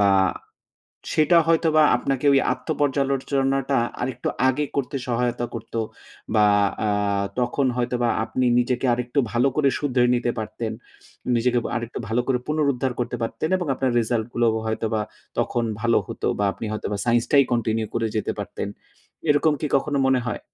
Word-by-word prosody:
বা 100 Hz, -1 st, +5 dB, 1.0 s
সেটা 155 Hz, +2 st, +4 dB
হয়তোবা 160 Hz, -1 st, +4 dB
আপনাকে 135 Hz, +2 st, -1 dB
ওই 135 Hz, -, +5 dB
আত্ম 125 Hz, +2 st, -8 dB
পর্যালোচনাটা 135 Hz, -1 st, +1 dB, 0.2 s
আরেকটু 125 Hz, -1 st, -3 dB, 0.2 s
আগে 145 Hz, +3 st, +1 dB
করতে 140 Hz, 0 st, -1 dB
সহায়তা 120 Hz, 0 st, 0 dB
করত। 115 Hz, 0 st, -8 dB, 0.6 s
বা 105 Hz, -1 st, +5 dB, 0.4 s
আ -, -, +1 dB, 0.5 s
তখন 125 Hz, +3 st, +1 dB
হয়তোবা 120 Hz, -1 st, 0 dB, 0.2 s
আপনি 130 Hz, +2 st, -1 dB
নিজেকে 125 Hz, +1 st, 0 dB
আরেকটু 125 Hz, +3 st, -3 dB
ভালো 125 Hz, +3 st, +3 dB
করে 140 Hz, -2 st, +4 dB
শুধরে 125 Hz, -4 st, +2 dB
নিতে 120 Hz, 0 st, 0 dB
পারতেন। 110 Hz, +1 st, -4 dB, 0.6 s
নিজেকে 120 Hz, +1 st, +2 dB, 0.2 s
আরেকটু 120 Hz, 0 st, -4 dB
ভালো 115 Hz, +2 st, +1 dB
করে 130 Hz, -2 st, +1 dB
পুনরুদ্ধার 140 Hz, -4 st, +1 dB
করতে 125 Hz, 0 st, -2 dB
পারতেন 135 Hz, +7 st, -2 dB
এবং 180 Hz, -3 st, -3 dB
আপনার 130 Hz, -1 st, 0 dB
রেসাল্ট 115 Hz, -1 st, -1 dB
গুলো 120 Hz, 0 st, +2 dB, 0.2 s
হয়তোবা 110 Hz, 0 st, -1 dB, 0.4 s
তখন 120 Hz, -, 0 dB, 0.2 s
ভালো 115 Hz, 0 st, +3 dB
হতো -, -, -5 dB
বা 100 Hz, -, +1 dB
আপনি 115 Hz, -, -6 dB
হয়তোবা 105 Hz, -1 st, -3 dB
সাইন্স 120 Hz, 0 st, +2 dB
টাই 140 Hz, -1 st, +7 dB
কন্টিনিউ 110 Hz, -2 st, 0 dB
করে 115 Hz, -1 st, 0 dB
যেতে 105 Hz, -, -1 dB
পারতেন। 100 Hz, -, -4 dB, 0.6 s
এরকম 145 Hz, +1 st, +4 dB
কি 150 Hz, -, -1 dB
কখনো 140 Hz, +1 st, -1 dB
মনে 130 Hz, -1 st, +3 dB
হয়? 120 Hz, -, -3 dB
125 Hz, 155 wpm, -23 LUFS, 115-140 Hz, 1.0 s, টাই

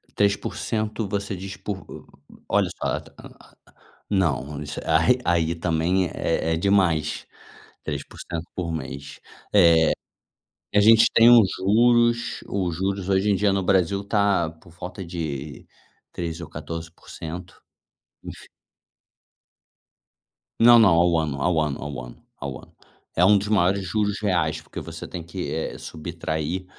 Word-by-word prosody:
3% 105 Hz, +1 st, -1 dB
você 100 Hz, 0 st, -3 dB
diz 95 Hz, +2 st, -7 dB
por 100 Hz, -2 st, -5 dB
o -, -, -10 dB, 0.4 s
olha -, -, +2 dB
só, -, -, -1 dB, 1.1 s
não 75 Hz, -7 st, 0 dB
isso 75 Hz, -, -6 dB
a 80 Hz, -1 st, +3 dB
re 85 Hz, +10 st, +3 dB
aí, 85 Hz, -1 st, +1 dB
também, 85 Hz, +2 st, 0 dB
é 80 Hz, 0 st, -1 dB
é -, -, 0 dB
demais, 90 Hz, -4 st, +1 dB, 0.6 s
3% 85 Hz, -1 st, -6 dB
por 85 Hz, -2 st, -3 dB
mês, 70 Hz, -2 st, -7 dB, 1.5 s
eh, 105 Hz, -, +5 dB
a -, -, +5 dB
gente 110 Hz, +1 st, +7 dB
tem 115 Hz, +1 st, +7 dB
os 115 Hz, -6 st, +7 dB
juros 120 Hz, +4 st, +3 dB
os 90 Hz, -4 st, -2 dB
juros, 95 Hz, +1 st, -2 dB
hoje 95 Hz, +2 st, +2 dB
em -, -, +3 dB
dia 100 Hz, +1 st, +2 dB
no 95 Hz, -1 st, 0 dB
Brasil, 95 Hz, +1 st, +2 dB
está 100 Hz, -4 st, +1 dB
por 80 Hz, +1 st, -18 dB
volta 90 Hz, +2 st, -7 dB
de 75 Hz, -5 st, -5 dB, 0.5 s
13% 85 Hz, -1 st, -5 dB
ou -, -, -17 dB
14%, 85 Hz, +2 st, -8 dB, 0.6 s
enfim. -, -, -10 dB, 2.1 s
Não, 120 Hz, 0 st, +8 dB
não, 110 Hz, -, +7 dB
ao 85 Hz, 0 st, +3 dB
ano 75 Hz, -3 st, -2 dB
ao 80 Hz, +3 st, +1 dB
ano 75 Hz, -3 st, -1 dB
ao 70 Hz, -3 st, -6 dB
ano -, -, -15 dB
ao 70 Hz, -2 st, -6 dB
ano, -, -, -20 dB, 0.4 s
é 85 Hz, -, +3 dB
um 105 Hz, +2 st, +6 dB
dos 100 Hz, -, -3 dB
maiores 100 Hz, -1 st, +2 dB
juros 105 Hz, +3 st, -1 dB
reais, 95 Hz, -5 st, 0 dB
porque -, -, -9 dB
você -, -, -8 dB
tem 90 Hz, -, -6 dB
que, 90 Hz, +2 st, -5 dB
eh, 80 Hz, -, -3 dB
subtrair 80 Hz, +2 st, -4 dB
90 Hz, 140 wpm, -24 LUFS, 80-100 Hz, 2.1 s, Não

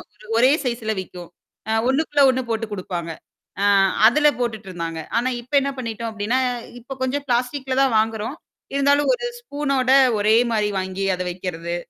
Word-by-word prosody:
ஒரு 215 Hz, -, -17 dB
ஒரே 255 Hz, +2 st, +5 dB
சைசுல 235 Hz, -3 st, -2 dB
விக்கும். 180 Hz, -2 st, -11 dB, 0.4 s
அ -, -, 0 dB, 0.2 s
ஒண்ணுக்குள்ள 290 Hz, +1 st, +2 dB
ஒண்ணு 260 Hz, 0 st, -2 dB
போட்டுக் 220 Hz, -1 st, -3 dB
குடுப்பாங்க. 175 Hz, -3 st, -5 dB, 0.5 s
அ -, -, +3 dB, 0.4 s
அதுல 300 Hz, +5 st, +3 dB
போட்டுட்டு 220 Hz, -4 st, -3 dB
இருந்தாங்க. 165 Hz, -2 st, -5 dB, 0.2 s
ஆனா 250 Hz, +2 st, +1 dB
இப்ப 245 Hz, +4 st, -21 dB
என்னா 275 Hz, 0 st, -2 dB
பண்ணிட்டோம் 230 Hz, -1 st, -4 dB
அப்டின்னா, 220 Hz, +4 st, -1 dB, 0.4 s
இப்ப 265 Hz, +3 st, -8 dB
கொஞ்சம் 280 Hz, +2 st, -2 dB
பிளாஸ்டிக்ல 260 Hz, +2 st, -1 dB
தான் 260 Hz, -4 st, +2 dB
வாங்குறோம். 220 Hz, +5 st, -2 dB, 0.4 s
இருந்தாலும் 285 Hz, -, +3 dB
ஒரு 485 Hz, 0 st, -6 dB
ஸ்பூனோட 280 Hz, -, -1 dB, 0.3 s
ஒரே 215 Hz, +2 st, +4 dB, 0.2 s
மாரி 210 Hz, -1 st, +1 dB
வாங்கி 190 Hz, +1 st, -3 dB
அதை 180 Hz, -, -4 dB
வைக்கிறது. 175 Hz, -1 st, -5 dB
235 Hz, 155 wpm, -22 LUFS, 205-270 Hz, 0.5 s, ஒரே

